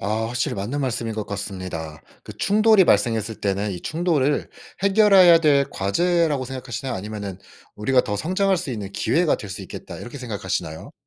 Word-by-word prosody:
아 110 +3 -1
확실히 120 +1 -2
맞는 110 +9 -3
말씀인 120 -3 -2
것 110 -1 -4
같습니다. 95 -6 -6 0.2
그 - - -9
충돌이 215 -1 +4
발생했을 110 -1 +1
때는 100 0 -1
이 90 - -6
충돌을 155 -4 0 0.3
해결해야 195 -4 +6
될 140 -3 +3
과제라고 150 - +1
생각하시나요? 125 -1 -5
아니면은 100 -1 -6 0.4
우리가 125 +4 +2
더 105 -4 -3
성장할 190 - +1
수 165 -6 -4
있는 100 -4 -5
기회가 170 -1 +1
될 100 - -9
수 - - -6
있겠다 - - -9
이렇게 120 +4 -9
생각하시나요? 95 -9 -4
120 Hz, 400 characters per minute, -22 LUFS, 100-160 Hz, 0.4 s, 해결해야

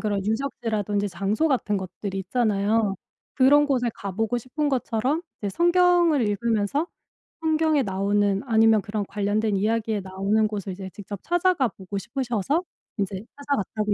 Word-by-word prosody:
그런 205 -3 -1
유적지라든지 215 -3 -1
장소 200 - 0
같은 235 -6 +1
것들이 195 +1 -5
있잖아요. 210 0 +1 0.4
그런 285 +2 +5
곳에 255 -4 +1
가 200 -2 -6
보고 225 +4 0
싶은 275 +5 -2
것처럼 260 +3 0 0.2
이제 205 - -3
성경을 345 - +4
읽으면서 225 - 0 0.6
성경에 315 -2 +2
나오는 200 0 +1
아니면 225 -2 +5
그런 205 0 -3
관련된 205 +1 0
이야기에 220 +1 0
나오는 195 +3 +1
곳을 205 -2 -4
이제 190 +1 -7
직접 205 -1 -7
찾아가 350 -6 +2
보고 195 -1 -7
싶으셔서 250 - -1 0.3
이제 195 -1 -2
찾아갔다고 215 -7 -1
220 Hz, 360 characters per minute, -25 LUFS, 200-270 Hz, 0.6 s, 그런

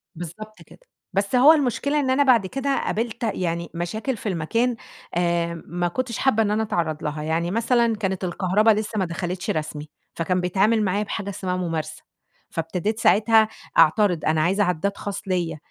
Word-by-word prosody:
بالضبط 175 +6 -9
كده، - - -16 0.3
بس 200 +5 0
هو 275 +5 +8
المشكلة 285 0 0
إن 270 -3 0
أنا 265 +2 +4
بَعد 245 -7 +4
كده 270 +5 -1
قابِلت 230 +2 -2
يعني 170 -6 -2
مشاكل 215 +9 -3
في 215 - -4
المكان 230 +8 0 0.4
آآ، 170 -1 0
ما 175 +1 -2
كنتش 235 +5 -3
حابّة 225 -5 +2
إن 205 - 0
أنا 215 +1 +1
أتعرّض 160 -7 -2
لها، 150 0 -3
يعني 165 +2 -1
مثلًا 230 +1 +2
كانت 190 -3 -3
الكهربا 185 +4 +1
لسه 215 0 -1
ما 190 - +1
دخلِتش 180 +2 -4
رسمي، 150 -1 -3 0.3
فكان 180 +2 0
بيتعامل 200 +5 +2
معايا 200 +1 0
بحاجة 200 -1 -4
اسمها 185 -2 -3
مُمارسة، 165 -4 -4 0.5
فابتديت 180 +7 -2
ساعتها 220 +1 +4 0.3
أعترِض، 175 +1 +4
أنا 155 0 +2
عايزة 190 +6 +2
عدّاد 185 +2 -1
خاص 200 -1 -5
ليَّ 175 -4 -1
195 Hz, 170 wpm, -23 LUFS, 170-220 Hz, 0.5 s, هو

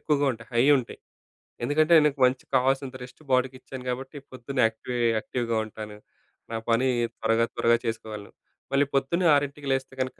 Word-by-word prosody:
ఎక్కువగా 145 -2 +1
ఉంటాయి. 115 +2 -12
హై 120 +2 +4
ఉంటాయి. 120 - -7 0.7
ఎందుకంటే, 155 +4 +4
నాకు 140 -2 0
మంచి 125 +1 -3
కావాల్సినంత 135 +1 +1
రెస్ట్ 125 +4 -13
బాడీకిచ్చాను 130 0 -2
కాబట్టి 135 +3 -5
పొద్దున్నే 130 +1 -3
యాక్టివే 120 +2 -5 0.2
యాక్టివ్‌గా 115 0 -2
ఉంటాను. 105 -1 -9 0.6
నా - - -1
పని 125 +3 +3 0.3
త్వరగా, 115 +1 +2
త్వరగా 115 0 +3
చేసుకోవాలి. 110 -2 -5 0.4
మళ్ళీ 140 +1 +4
పొద్దున్నే 170 +7 +1
6కి 145 0 -2
లేస్తే, 135 0 -3
కనుక 130 0 -4
130 Hz, 145 wpm, -26 LUFS, 115-140 Hz, 0.7 s, హై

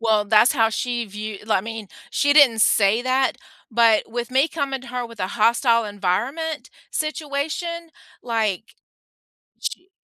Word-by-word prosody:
Well, 220 -2 +2
that's 220 +5 +5
how 225 -5 +3
she 240 +1 -2
view 210 0 -7
li - - -10
I 190 - +3
mean, 225 -3 -7 0.2
she 285 0 +2
didn't 255 -7 +6
say 210 +2 +4
that, 260 0 +1 0.3
but 225 -1 +3
with 240 +1 -4
me 265 +4 +3
coming 275 -4 -3
to 260 - -11
her 245 -1 -4
with 230 -3 -13
a 185 - 0
hostile 230 +1 +2
environment 225 - -2 0.2
situation, 315 +3 -3 0.3
like 220 -3 -2 0.9
she 360 - -5
235 Hz, 150 wpm, -22 LUFS, 215-280 Hz, 0.9 s, didn't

